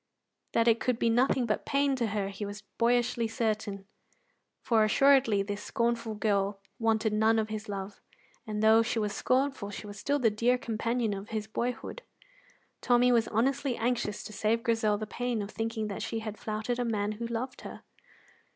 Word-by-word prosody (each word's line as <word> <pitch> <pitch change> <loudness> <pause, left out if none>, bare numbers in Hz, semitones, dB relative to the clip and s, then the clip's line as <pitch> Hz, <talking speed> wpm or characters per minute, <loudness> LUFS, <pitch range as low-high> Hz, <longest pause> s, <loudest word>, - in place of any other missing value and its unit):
That 230 0 +3
it 230 0 +5
could 250 -2 0
be 230 -1 +2
nothing 250 +1 +3
but 215 -2 -1
pain 280 -1 +1
to 235 -3 0
her 205 -2 -2
he 200 +1 -6
was 205 0 -6 0.2
boyishly 240 0 +2
certain, 215 -3 -2 0.8
for 225 -2 +3
assuredly 235 -2 +4
this 205 +1 -4
scornful 235 -1 -1
girl 200 -1 0 0.2
wanted 220 -1 +1
none 220 +1 +3
of 220 -1 0
his 215 0 -5
love. 195 0 -6 0.5
And 210 0 -2
though 220 +1 +7
she 230 +1 -1
was 210 -2 0
scornful, 265 -5 0
she 205 - -7
was 205 0 -9
still 285 +6 +1
the 235 -6 +3
dear 235 +4 +2
companion 230 -1 -1
of 200 +2 -7
his 215 -1 -3
boyhood. 240 - -4 0.8
Tommy 245 0 +4
was 230 -2 +3
honestly 265 +3 0
anxious 230 -3 -1
to 215 - -9
save 220 +2 0
Grizel 225 -3 +2
the 215 - -4
pain 245 +1 -2
of 205 0 -4
thinking 225 -1 -2
that 200 - -5
she 225 - -3
had 215 -1 -5
flouted 220 +3 -3
a - - +1
man 210 -3 -1
who 230 +2 -4
loved 235 +3 -4
her. - - -9
225 Hz, 185 wpm, -29 LUFS, 210-240 Hz, 0.8 s, though